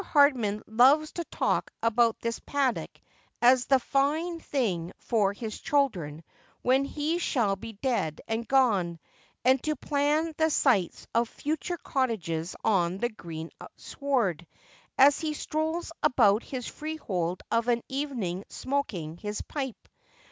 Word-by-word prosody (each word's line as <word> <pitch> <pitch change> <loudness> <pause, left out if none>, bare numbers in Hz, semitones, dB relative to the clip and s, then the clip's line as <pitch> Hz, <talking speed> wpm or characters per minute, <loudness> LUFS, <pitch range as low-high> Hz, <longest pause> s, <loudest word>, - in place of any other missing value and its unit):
Hardman 260 - +3
loves 270 +8 +4
to 340 - -4
talk - - -1
about 230 0 +3
this 230 0 -2
paddock 275 -4 -1 0.5
as 245 +1 +5
a. 270 - +7
fine 300 +7 0
thing 195 - -2
for 210 -5 +1
his 215 +1 -6
children 175 - 0 0.4
when 265 +2 +3
he 305 +4 -1
shall 230 - +1
be 225 +3 -9
dead 205 - -1
and 225 +1 -2
gone, 205 -11 +2 0.5
and 260 0 +5
to 305 0 -1
plan 295 +4 0
the 320 0 +3
sites 245 - +2
of 230 0 +2
future 315 +4 -3
cottages 185 - -2
on 185 -4 +2
the 240 +4 0
green 165 -7 -8 0.3
sward, 220 - -1 0.5
as 280 +1 +6
he 310 -1 -2
strolls 320 +3 -2
about 220 -4 +4
his 250 -2 -6
freehold 190 - -3
of 230 +1 +1
an 235 -1 +2
evening 250 -10 -3
smoking 195 - -3
his 210 +2 -4
pipe. 265 -5 -5
245 Hz, 135 wpm, -28 LUFS, 200-285 Hz, 0.5 s, a